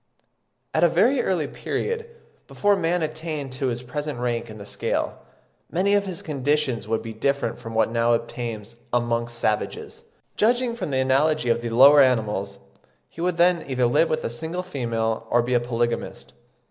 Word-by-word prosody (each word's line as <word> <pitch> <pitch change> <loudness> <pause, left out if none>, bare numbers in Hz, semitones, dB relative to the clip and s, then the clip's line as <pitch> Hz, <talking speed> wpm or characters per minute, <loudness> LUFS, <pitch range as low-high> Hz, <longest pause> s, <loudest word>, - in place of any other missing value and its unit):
At 160 - +2
a 170 - +6
very 235 +11 +3
early 175 -5 0
period, 460 - -3 0.4
before 205 0 +2
man 175 -2 0
attained 155 -3 -4
to 130 +1 -2
his 120 0 -3
present 145 +2 -4
rank 120 -1 -2
in 110 - -9
the 100 - -9
scale, - - -2 0.5
many 190 +4 +2
of 200 -1 +2
his 180 -3 -4
conditions 145 -4 -1
would 110 0 -1
be 115 - -6
different 140 +6 -1
from 115 -2 -8
what 110 0 +2
now 115 0 +2
obtains 115 -1 -4
amongst 120 -1 -1
savages. 110 -2 -2 0.3
Judging 240 +2 +2
from 235 - -4
the 135 - -1
analogy 135 +2 +2
of 115 0 +2
the 120 - -3
lower 140 +5 +7
animals, 105 -6 +1 0.5
he 165 - -9
would 180 -1 0
then 175 0 +3
either 130 -2 +1
live 125 +7 +3
with 155 0 -1
a - - -2
single 160 +9 -3
female, 115 -8 -2
or 120 0 +3
be 125 +1 -1
a 120 - +4
polygamist. 120 0 -3
130 Hz, 175 wpm, -24 LUFS, 115-165 Hz, 0.5 s, lower